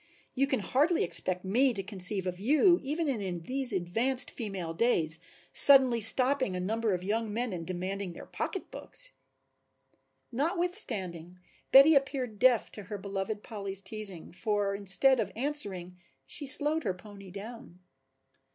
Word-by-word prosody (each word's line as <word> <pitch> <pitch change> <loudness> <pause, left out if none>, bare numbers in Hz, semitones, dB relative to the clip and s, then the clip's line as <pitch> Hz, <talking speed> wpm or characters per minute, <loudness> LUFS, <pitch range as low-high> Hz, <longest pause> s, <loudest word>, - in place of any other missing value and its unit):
You 275 +1 -1
can 265 -6 -2
hardly 300 - 0
expect 180 +2 0
me 245 +6 +1
to 195 - -4
conceive 190 -1 -1
of 180 -1 -5
you, 305 - +2
even 305 +4 -4
in 195 -10 -4
these 260 +3 -2
advanced 225 +9 -1
female 195 -8 -6
days, 165 -6 +1 0.3
suddenly 260 -4 +6
stopping 255 -1 +6
a - - -4
number 215 +2 -2
of 180 - -8
young 220 +2 -3
men 230 0 -4
and 165 -2 -8
demanding 185 +1 -5
their - - -12
pocketbooks." - - -4 1.2
Notwithstanding 240 - -2 0.3
Betty 275 +4 +7
appeared 260 -6 -2
deaf 250 -1 +2
to 210 - -10
her 205 +3 -7
beloved 200 +1 -6
Polly's 200 -4 -5
teasing, 195 -4 -2
for 205 +1 -3
instead 200 +7 +5
of - - -3
answering 205 -10 -3 0.3
she 280 - -7
slowed 295 +3 +4
her 190 - -3
pony 200 0 -14
down. 200 -1 -12
210 Hz, 140 wpm, -28 LUFS, 185-265 Hz, 1.2 s, Betty